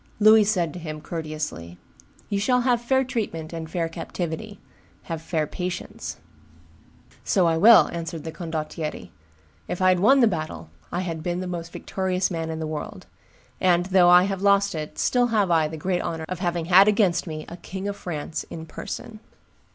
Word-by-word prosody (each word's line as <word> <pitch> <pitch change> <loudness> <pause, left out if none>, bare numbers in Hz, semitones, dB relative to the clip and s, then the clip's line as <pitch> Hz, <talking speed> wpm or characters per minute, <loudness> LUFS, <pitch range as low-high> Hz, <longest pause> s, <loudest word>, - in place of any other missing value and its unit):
Louis 215 0 +7
said 180 -7 0
to 180 - -7
him, 155 -2 -6
courteously, 155 - -5 0.5
"You 200 - -1
shall 250 +4 +2
have 245 -1 +2
fair 265 +2 +2
treatment 200 -11 -4
and 160 -1 -6
fair 165 0 -1
captivity; 175 +5 -5 0.4
have 165 -1 -5
fair 160 -1 -1
patience." 180 +4 -5 1.1
"So 185 - +2
I 165 -1 +3
will," 225 +7 +8
answered 165 -2 -5
the 160 - -5
condottiere; 160 -2 -5 0.6
"if 180 - -4
I 185 0 +4
had 180 -1 +3
won 265 +9 +5
the 240 - +6
battle, 155 - -4 0.2
I 175 - -1
had 165 -3 -4
been 175 +2 -2
the 185 - -4
most 170 -2 -5
victorious 185 0 -2
man 165 -2 -3
in 160 - -4
the 160 - -3
world; 155 -1 -6 0.5
and, 175 -1 +3
though 185 -2 +5
I 180 0 +8
have 195 -1 -2
lost 200 0 +3
it, 155 -2 -6
still 245 -1 +2
have 210 -6 +1
I 160 -2 +3
the 160 +1 -7
great 180 +3 -1
honor 160 -1 -4
of 185 0 -5
having 175 -2 -1
had 190 +3 +7
against 200 -5 +2
me 155 -1 -5
a 175 - -9
King 190 +2 -6
of 200 - -3
France 160 -5 -5
in 160 -1 -7
person." 215 +6 -7
175 Hz, 185 wpm, -24 LUFS, 160-200 Hz, 1.1 s, will